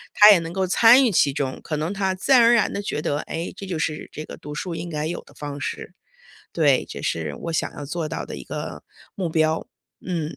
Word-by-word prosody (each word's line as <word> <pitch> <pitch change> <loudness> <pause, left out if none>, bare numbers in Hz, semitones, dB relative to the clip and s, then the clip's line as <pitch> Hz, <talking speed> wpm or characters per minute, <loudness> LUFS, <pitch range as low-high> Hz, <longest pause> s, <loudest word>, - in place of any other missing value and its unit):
他 210 +1 +10
也 200 - +6
能 165 0 -6
够 190 +1 0
参 235 +7 +6
与 230 - +2
其 145 -5 +3
中， 135 -2 -3
可 155 - -3
能 160 +5 -2
他 190 -1 -1
自 185 - -3
然 255 -2 +8
而 235 +1 +6
然 230 -3 +2
地 200 - -2
觉 200 - -3
得， 145 - 0
诶， 165 +2 -5
这 195 - -8
就 180 -3 -3
是 155 -1 -3
这 155 - -7
个 - - -9
读 150 +1 -9
书 175 +2 -4
应 175 - -5
该 150 -2 -3
有 170 +2 -3
的 - - -19
方 145 -1 -6
式。 175 - -5 0.6
对， 145 -6 +3
这 - - -7
是 80 -3 -2
我 165 - -3
想 160 - -1
要 145 - -7
做 155 +2 -3
到 - - -4
的 - - -8
一 - - -9
个 - - -6 0.3
目 185 -3 -1
标， 160 0 +1 0.4
嗯。 165 -4 -3
165 Hz, 265 characters per minute, -23 LUFS, 150-190 Hz, 0.6 s, 他